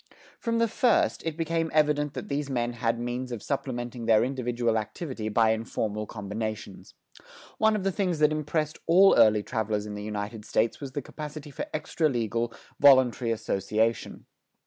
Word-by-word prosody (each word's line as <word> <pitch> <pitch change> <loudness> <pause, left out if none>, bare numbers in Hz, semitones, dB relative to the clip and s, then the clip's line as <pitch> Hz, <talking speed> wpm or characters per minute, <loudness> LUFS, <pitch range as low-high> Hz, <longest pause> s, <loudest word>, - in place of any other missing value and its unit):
From 230 -1 -1
the 230 0 +3
first, 235 +2 +2
it 160 -1 -3
became 165 0 -1
evident 150 -1 +2
that - - -5
these 145 0 -2
men 120 -2 -1
had 115 0 -1
means 120 +1 -4
of 120 -4 -5
supplementing 120 -4 -4
their 110 -1 +5
individual 120 -3 0
activity 110 0 -5
by 110 +1 +3
informal 110 -1 -2
combinations. 105 -1 -6 0.6
One 220 0 +4
of 205 - -2
the 195 - +1
things 180 -3 -1
that 150 0 +4
impressed 155 0 -2
all 190 +4 +7
early 105 -1 +5
travelers 110 -3 -2
in 105 - -6
the 105 - -6
United 105 +1 -5
States 110 +3 0
was 135 -2 -6
the 145 - -3
capacity 150 0 -8
for - - -5
extra 155 +1 0
legal, 115 -2 -1 0.3
voluntary 130 -4 +5
association. 110 0 -1
120 Hz, 165 wpm, -27 LUFS, 110-150 Hz, 0.6 s, all